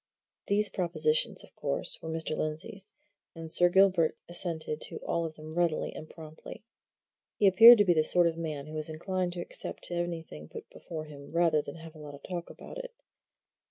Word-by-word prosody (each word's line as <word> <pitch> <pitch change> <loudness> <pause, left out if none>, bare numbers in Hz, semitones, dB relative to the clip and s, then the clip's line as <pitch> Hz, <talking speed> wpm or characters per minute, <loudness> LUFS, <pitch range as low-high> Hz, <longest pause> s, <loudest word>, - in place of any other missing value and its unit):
These 205 +1 +3
propositions, 460 - 0
of - - -18
course, - - -3
were 160 - -6
Mr. 160 -1 -3
Lindsey's, 190 +8 -3 0.4
and 165 -1 -8
Sir 175 +2 +5
Gilbert 185 -3 +4
assented 165 -3 -2
to - - -7
all 170 0 0
of 160 -1 -6
them 155 0 -10
readily 170 -2 0
and 155 - -9
promptly. 155 +4 -11 0.7
He 205 - +1
appeared 225 +5 +10
to 205 - +4
be 180 - +4
the 155 -2 +3
sort 175 +2 +5
of 165 -1 +1
man 155 -4 -5
who 155 0 -7
is 155 - -6
inclined 180 +3 -2
to 175 - -5
accept 175 - -5
anything 165 - -4
put - - -9
before 155 -2 -7
him 145 -2 -12
rather 165 -2 +3
than 145 - -9
have 165 -1 -11
a 155 - -14
lot 145 -1 -9
of 140 - -16
talk 175 -2 -5
about - - -10
it. - - -8
165 Hz, 195 wpm, -30 LUFS, 155-185 Hz, 0.7 s, appeared